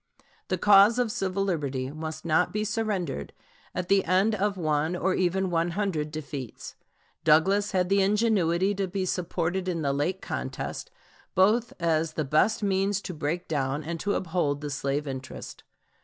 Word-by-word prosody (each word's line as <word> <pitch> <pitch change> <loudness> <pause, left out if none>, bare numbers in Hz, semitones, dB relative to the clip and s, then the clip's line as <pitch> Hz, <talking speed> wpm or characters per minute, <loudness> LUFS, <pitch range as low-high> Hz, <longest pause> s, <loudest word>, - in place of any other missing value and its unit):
The 185 - 0
cause 205 +4 +6
of 245 -3 +1
civil 195 -1 -1
liberty 140 -8 -2
must 155 +1 -6
not 165 +2 +2
be 210 0 -1
surrendered 205 - -2 0.4
at 180 -1 -2
the 195 +1 +4
end 190 +5 +3
of 205 -1 0
one 155 0 0
or 185 +1 +1
even 185 +1 0
one 165 0 +1
hundred 170 -8 -1
defeats. 145 -5 -7 0.5
Douglas 190 +7 +4
had 185 -2 +1
the 195 +1 +3
ingenuity 195 -3 +2
to 195 -1 -2
be 190 +1 -2
supported 180 +1 -2
in 170 -3 -1
the 140 -1 +1
late 160 +7 -1
contest, 475 - -5 0.5
both 215 +5 +3
as 165 -1 +1
the 155 - -2
best 180 +11 +2
means 195 0 +1
to 185 - -6
break 160 +3 -3
down 140 -1 -1
and 165 +2 -4
to 205 +3 0
uphold 160 -5 -1
the 145 -1 -4
slave 140 +1 -1
interest. 130 -1 -7
180 Hz, 165 wpm, -27 LUFS, 155-195 Hz, 0.5 s, cause